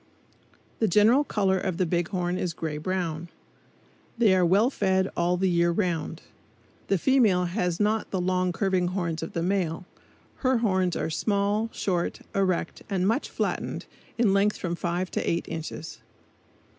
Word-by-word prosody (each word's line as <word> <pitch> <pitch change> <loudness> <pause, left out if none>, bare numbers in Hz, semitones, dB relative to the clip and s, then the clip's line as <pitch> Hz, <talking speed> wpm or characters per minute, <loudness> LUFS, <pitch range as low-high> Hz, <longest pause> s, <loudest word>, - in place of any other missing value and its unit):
The 220 - +3
general 215 - +5
color 195 -8 +1
of 185 -2 -2
the 185 - +2
big 175 0 0
horn 180 -2 -1
is 180 -3 -2
gray 155 -2 -4
brown. 170 -1 -3 0.9
They 225 -5 +5
are 185 - +3
well 200 +9 +4
fed 190 -4 +1
all 175 +1 +1
the 190 +1 +1
year 170 -1 +3
round. 170 -3 -2 0.6
The 195 - +2
female 210 -5 +3
has 180 -1 -1
not 215 +1 +1
the 190 - -2
long 185 0 +1
curving 185 0 +1
horns 175 -3 -2
of 165 - -6
the 165 - -1
male. 180 -2 -1 0.5
Her 260 -1 +2
horns 185 -6 +1
are 160 - -2
small, 205 +5 0
short, 175 -3 -2
erect, 185 -4 0
and 190 -2 +1
much 225 +7 0
flattened, - - -3 0.3
in 225 -5 +3
length 200 +1 +2
from 175 -2 -3
five 175 +1 -2
to - - -1
eight 170 - -1
inches. 160 0 -6
185 Hz, 160 wpm, -26 LUFS, 170-200 Hz, 0.9 s, general